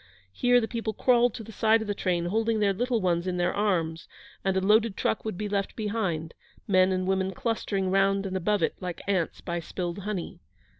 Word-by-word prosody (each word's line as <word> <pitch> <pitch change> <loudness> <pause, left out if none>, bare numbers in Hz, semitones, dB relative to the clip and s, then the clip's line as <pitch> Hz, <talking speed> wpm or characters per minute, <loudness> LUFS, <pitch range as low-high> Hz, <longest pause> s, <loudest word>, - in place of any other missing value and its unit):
Here 245 - +3
the 225 - -2
people 225 -2 -3
crawled 245 -1 +3
to 225 - -6
the 225 - -10
side 220 +1 +3
of 220 - -4
the 205 - 0
train, 175 -3 -1
holding 220 +4 +1
their 200 -1 +3
little 240 +2 0
ones 175 -1 0
in 180 -1 -1
their 175 0 +1
arms; 170 -6 0 0.4
and 190 -1 +1
a - - +4
loaded 210 +2 +3
truck - - 0
would 215 -5 -4
be 210 - -3
left 200 -1 -2
behind, 195 -8 -2 0.3
men 185 -1 +4
and 185 0 0
women 190 0 0
clustering 200 -4 -1
round 195 +1 +2
and 190 -1 -3
above 190 +1 +1
it - - +1
like 180 -2 -6
ants 185 -5 0
by 170 0 -3
spilled 175 +2 -4
honey. 200 - -4
195 Hz, 210 wpm, -27 LUFS, 180-220 Hz, 0.4 s, a